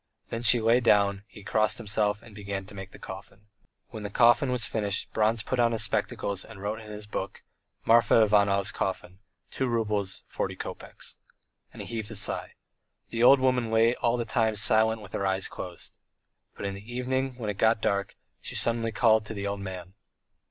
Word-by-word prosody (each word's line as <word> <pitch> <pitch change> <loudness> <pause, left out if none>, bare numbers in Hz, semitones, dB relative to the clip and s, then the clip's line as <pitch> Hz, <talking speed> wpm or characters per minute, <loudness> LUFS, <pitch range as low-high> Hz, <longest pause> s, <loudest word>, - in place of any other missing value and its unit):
Then 115 - -3
she 120 +1 +7
lay 115 +2 +4
down, 105 -4 +4
and 100 0 -11
he 105 - -14
crossed 110 +1 +1
himself 105 -1 -1
and 115 - -14
began 100 -1 -5
making 95 -1 -8
the - - -12
coffin. 100 +2 -11 0.4
When 110 -4 -8
the 100 - -4
coffin 120 +5 +4
was 125 -4 +1
finished 105 -3 -2
Bronze 110 0 +1
put 130 +3 -2
on 120 -1 +3
his 110 -1 +1
spectacles 100 -1 -2
and - - -12
wrote 105 +3 -3
in 110 -1 -11
his 105 0 -8
book: 100 -2 -5 0.4
"Marfa 115 0 +5
Ivanov's 100 -2 +2
coffin, 95 -1 -4 0.3
two 130 - -1
roubles, 105 -5 -1
forty - - -3
kopecks." - - -9 0.5
And - - -8
he - - -9
heaved 110 -2 -4
a 115 - -7
sigh. 100 - -1 0.6
The 115 - -2
old 135 +3 +7
woman 125 -3 +1
lay 115 +1 +4
all 120 -1 0
the 120 - -2
time 110 -1 +1
silent 110 +1 +2
with 95 - -13
her 100 - -1
eyes 95 0 0
closed. 90 -2 -8 0.6
But - - -6
in 100 - -2
the 100 +4 -10
evening, 130 +1 -2
when 110 -4 -3
it 100 - -10
got 110 0 +3
dark, 100 -2 -1 0.3
she - - -5
suddenly 115 -1 0
called 110 -1 +3
the 105 -2 -5
old 100 0 -3
man. 95 -2 -7
110 Hz, 195 wpm, -27 LUFS, 100-115 Hz, 0.6 s, she